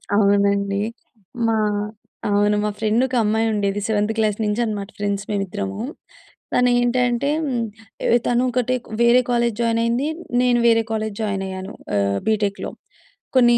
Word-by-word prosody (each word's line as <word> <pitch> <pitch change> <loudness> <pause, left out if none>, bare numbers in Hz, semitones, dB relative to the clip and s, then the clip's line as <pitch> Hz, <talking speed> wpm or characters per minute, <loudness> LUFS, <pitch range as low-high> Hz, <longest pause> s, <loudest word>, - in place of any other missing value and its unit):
అవునండీ. 200 -1 +2 0.7
మా 225 - +2 0.7
అవును. 205 +1 +3
మా - - +1
ఫ్రెండొకమ్మాయుండేది. 220 -3 +1
7త్ 210 0 +1
క్లాస్ 215 -2 +1
నించనమాట 210 -2 -1
ఫ్రెండ్స్ 200 -1 -1
మేమిద్దరము. 200 0 -3 0.7
తనేంటంటే, 245 +1 +2 0.8
ఏ - - +2 0.2
తనొకటే 250 0 +1 0.3
వేరే 240 +2 +6
కాలేజ్ 235 -2 +1
జాయినయింది, 230 +4 +1 0.3
నేను 245 -1 +3
వేరే 230 -1 +4
కాలేజ్ 215 -2 -2
జాయినయ్యాను, 195 -2 -3 0.2
ఆహ్, 100 0 +1
బీటెక్‌‌‌‌‌‌లో. 205 -2 0 0.6
కొన్నీ 240 -2 +6
215 Hz, 100 wpm, -21 LUFS, 200-240 Hz, 0.8 s, వేరే